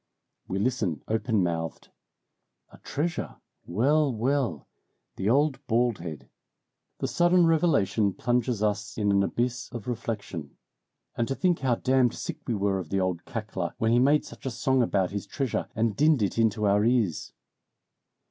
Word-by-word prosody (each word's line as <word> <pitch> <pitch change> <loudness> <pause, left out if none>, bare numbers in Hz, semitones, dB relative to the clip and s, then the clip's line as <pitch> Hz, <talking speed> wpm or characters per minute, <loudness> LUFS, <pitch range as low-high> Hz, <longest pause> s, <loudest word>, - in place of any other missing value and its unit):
We 95 - -2
listen 100 - -1
open 110 -2 +1
mouthed. 80 -5 -3 0.8
"A - - -16
treasure 160 +3 -3 0.3
well! 140 - +2
well! 120 - -1 0.5
The 95 +2 -1
old 140 +2 +2
bald 120 -1 +1
head!" 80 -4 -7 0.7
The - - -2
sudden 175 0 +4
revelation 140 - +2
plunges 120 -3 0
us 105 0 -1
in 105 -2 +1
an 100 0 +4
abyss 120 +4 -1
of 120 -1 -7
reflection. 110 - -5 0.6
"And 115 - 0
to 135 - -2
think 180 +1 +1
how 130 -3 +1
damned 130 -1 +2
sick - - -5
we 120 - 0
were 100 -1 0
of 85 -4 -7
the 95 - 0
old 90 -2 -1
cackler 105 -6 -4
when 110 0 +1
he 120 - +4
made 145 +4 +3
such - - -9
a - - +1
song 130 +1 +1
about 100 -5 +1
his 100 0 -4
treasure 130 +4 -2
and 110 -2 +1
dinned 150 -4 +3
it 100 +3 -1
into 110 -1 +2
our 100 +1 +3
ears!" 115 -7 +1
115 Hz, 160 wpm, -27 LUFS, 100-130 Hz, 0.8 s, sudden